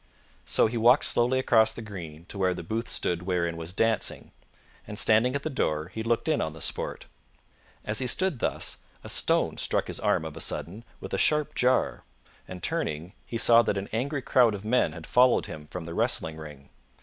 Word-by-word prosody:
So - - +4
he 115 +2 -1
walked 120 +5 +5
slowly 120 +2 +2
across 115 -4 +3
the - - -8
green 85 -6 -9
to 100 +1 -8
where 95 -1 +1
the 90 - -6
booth 110 +7 -3
stood 85 -1 +1
wherein 90 -2 -1
was 80 +1 -5
dancing, 115 +3 -1 0.6
and 105 - -7
standing 115 +6 +4
at 140 - -2
the - - -2
door 75 - -1
he 110 +5 -6
looked 115 +6 0
in 155 -2 +1
on 80 - -3
the 80 - -10
sport. - - -3 0.8
As 105 0 0
he 130 - 0
stood 185 0 +1
thus, - - -1 0.3
a - - -8
stone - - +1
struck - - 0
his - - -5
arm 80 - +1
of 80 -1 -7
a 85 - -5
sudden 105 +7 -3
with - - -8
a - - 0
sharp 150 -1 +2
jar, 130 +1 +1 0.4
and, 90 -2 -9
turning, 80 +5 -2
he 115 - -3
saw 115 0 +6
that 100 -3 -1
an 100 +1 -4
angry 135 +4 -2
crowd 120 -5 +4
of 100 +1 -9
men 120 -7 +2
had 80 -1 -9
followed 125 0 +4
him 75 -1 -9
from 90 +1 -7
the 85 - -6
wrestling 80 -1 -1
ring. 75 -3 -11
105 Hz, 210 wpm, -27 LUFS, 85-120 Hz, 0.8 s, saw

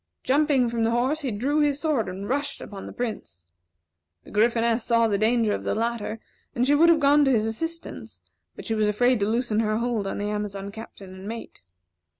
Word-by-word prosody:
Jumping 275 -2 +3
from 230 -1 -1
the 225 - +2
horse, 250 +6 +1
he 280 -4 -2
drew 260 +8 0
his 290 -1 +2
sword, 290 - 0
and 190 +2 -6
rushed 280 +2 -2
upon 195 -2 -8
the - - -7
Prince. 210 - -5 0.8
The - - -14
Gryphoness 230 +1 +2
saw 230 -1 +3
the 200 -2 0
danger 225 -1 +2
of - - -3
the - - -2
latter, 225 -1 -2 0.4
and 245 0 +2
she 285 - +3
would 325 +4 +5
have 330 -2 +5
gone 290 0 +5
to 270 - +3
his 220 -4 +2
assistance, 325 +10 -5 0.4
but - - -10
she 225 - -1
was 215 -1 +1
afraid 245 +3 +2
to 200 - +1
loosen 230 -1 0
her 215 -1 +1
hold 235 -4 -1
of - - -3
the 205 - -3
Amazon 205 -1 -4
Captain 200 -3 -10
and 190 +1 -10
mate. 225 - -8
230 Hz, 210 wpm, -25 LUFS, 210-265 Hz, 0.8 s, would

